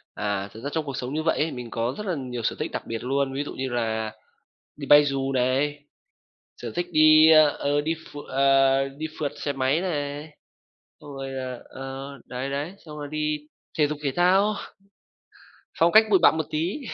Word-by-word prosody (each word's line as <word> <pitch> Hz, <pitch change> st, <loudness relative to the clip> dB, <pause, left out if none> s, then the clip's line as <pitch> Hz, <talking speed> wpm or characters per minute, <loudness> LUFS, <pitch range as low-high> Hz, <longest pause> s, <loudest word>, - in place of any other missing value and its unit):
À, 100 Hz, -1 st, -2 dB
thực 110 Hz, -, -11 dB
ra -, -, -2 dB
trong 160 Hz, -1 st, -1 dB
cuộc 140 Hz, -3 st, -5 dB
sống 125 Hz, +2 st, -4 dB
như 155 Hz, -, -1 dB
vậy 165 Hz, -, +1 dB
ấy, 155 Hz, +2 st, 0 dB
mình 125 Hz, -2 st, -7 dB
có 115 Hz, +2 st, -2 dB
rất 210 Hz, -, -5 dB
là 185 Hz, -, 0 dB
nhiều 125 Hz, -3 st, -5 dB
sở -, -, -1 dB
thích -, -, -3 dB
đặc -, -, -3 dB
biệt 115 Hz, 0 st, -5 dB
luôn, 135 Hz, +1 st, 0 dB
ví 140 Hz, +2 st, -2 dB
dụ -, -, -7 dB
như 130 Hz, 0 st, -3 dB
là 110 Hz, -3 st, -2 dB, 0.6 s
đi 140 Hz, -, -7 dB
bay 145 Hz, +1 st, +8 dB
dù 135 Hz, -1 st, -1 dB
này, 135 Hz, +3 st, +1 dB, 0.8 s
sở -, -, -5 dB
thích 175 Hz, 0 st, -1 dB
đi, 155 Hz, 0 st, +7 dB
ơ, 155 Hz, -1 st, +7 dB
ờ, 145 Hz, +1 st, 0 dB
đi 160 Hz, +2 st, -1 dB
ph 160 Hz, -2 st, -13 dB
ờ, 135 Hz, 0 st, +3 dB
đi 155 Hz, -, -4 dB
phượt 145 Hz, -2 st, -1 dB
xe 145 Hz, -, -3 dB
máy 135 Hz, +4 st, +1 dB
này, 145 Hz, -4 st, -3 dB, 0.7 s
xong 150 Hz, -, -11 dB
rồi 135 Hz, 0 st, -5 dB
là 130 Hz, -2 st, -5 dB
ờ, 135 Hz, +1 st, -7 dB, 0.2 s
đấy, 130 Hz, +2 st, -5 dB
đấy, 145 Hz, +6 st, -3 dB
xong 150 Hz, -1 st, -9 dB
rồi 145 Hz, -1 st, -6 dB
đi 150 Hz, 0 st, -1 dB, 0.4 s
thể 150 Hz, -, +4 dB
dục 150 Hz, 0 st, -4 dB
thể 140 Hz, -, 0 dB
thao. 190 Hz, +4 st, +3 dB, 1.2 s
Phong 170 Hz, +1 st, +4 dB
cách 220 Hz, +1 st, +8 dB
bụi 195 Hz, -, +6 dB
bặm -, -, +6 dB
một 160 Hz, -, -1 dB
tí. 170 Hz, -, -2 dB
140 Hz, 210 wpm, -25 LUFS, 130-155 Hz, 1.2 s, bay